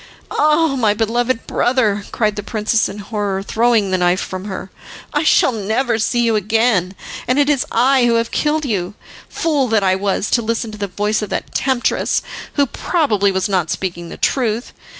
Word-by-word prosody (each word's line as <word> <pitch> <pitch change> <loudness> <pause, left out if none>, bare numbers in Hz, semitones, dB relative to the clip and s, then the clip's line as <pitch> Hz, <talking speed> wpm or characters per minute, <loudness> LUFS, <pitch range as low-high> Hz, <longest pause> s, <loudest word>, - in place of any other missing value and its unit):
"Ah! 305 -1 +2
my 210 -3 +2
beloved 230 +2 0
brother," 215 -5 +1
cried 210 -2 0
the 205 - -3
princess 215 +1 0
in 195 - -8
horror, 205 -2 -3
throwing 225 -2 +2
the 185 - +1
knife 180 +1 +2
from 185 0 -5
her, 190 -1 -6 0.4
"I 295 - +2
shall 310 - +4
never 225 +2 -1
see 240 +2 +1
you 230 -2 +2
again, 210 -3 +1 0.3
and 255 - +1
it 290 0 +3
is 280 -3 0
I 255 +1 +3
who 235 - +3
have 230 0 0
killed 305 0 0
you. 200 -5 -2 0.3
Fool 295 -5 0
that 220 -3 +2
I 185 -1 +3
was 195 +1 -1
to 240 - +3
listen 230 0 -2
to 215 - -9
the 200 - -2
voice 210 +3 -1
of 210 - -4
that - - -4
temptress, 260 -3 0 0.3
who 285 - +3
probably 230 - 0
was 190 -1 0
not 185 -5 0
speaking 175 -2 -4
the - - -9
truth. 235 -3 -1
220 Hz, 190 wpm, -18 LUFS, 200-250 Hz, 0.4 s, shall